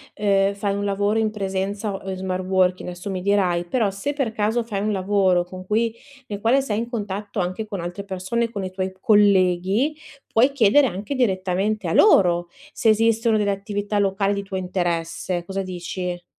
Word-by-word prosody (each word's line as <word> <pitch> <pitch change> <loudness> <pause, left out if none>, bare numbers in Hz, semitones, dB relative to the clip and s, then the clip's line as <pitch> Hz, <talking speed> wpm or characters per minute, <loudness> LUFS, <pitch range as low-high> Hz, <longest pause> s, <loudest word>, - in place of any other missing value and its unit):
ehm, 200 -1 +2
fai 200 0 -2
un 200 - -2
lavoro 205 +2 0
in 220 -1 +1
presenza, 200 +1 -3
o 195 0 -7
in 190 - -3
smart 185 0 -3
working, 185 -1 +1
adesso 180 +3 -7
mi 185 -1 -3
dirai, 185 -3 +1
però 225 -1 +1
se 200 +9 -3
per 275 -6 -2
caso 220 +2 0
fai 205 -4 -3
un 215 +1 0
lavoro 190 -2 +2
con 185 +1 -10
cui, 225 +3 +1 0.3
nel 205 -1 -6
quale 250 +5 +3
sei 220 -5 -2
in 235 - -4
contatto 205 -2 -4
anche 185 +4 -2
con 205 -3 -5
altre 175 +4 -5
persone, 200 +5 -2
con 200 -4 -4
i 185 - -5
tuoi 185 0 -3
colleghi, 200 - +3 0.3
puoi 250 +5 +3
chiedere 275 +1 +4
anche 205 +8 -4
direttamente 195 -3 0
a 165 - -1
loro, 175 - +4 0.2
se 225 - +2
esistono 225 +1 +3
delle 205 -1 +1
attività 205 +1 -3
locali 195 0 +1
di 200 0 -3
tuo 195 -1 -5
interesse. 175 -1 -2
Cosa 195 +1 -3
dici? 180 -1 -5
200 Hz, 185 wpm, -22 LUFS, 185-215 Hz, 0.3 s, chiedere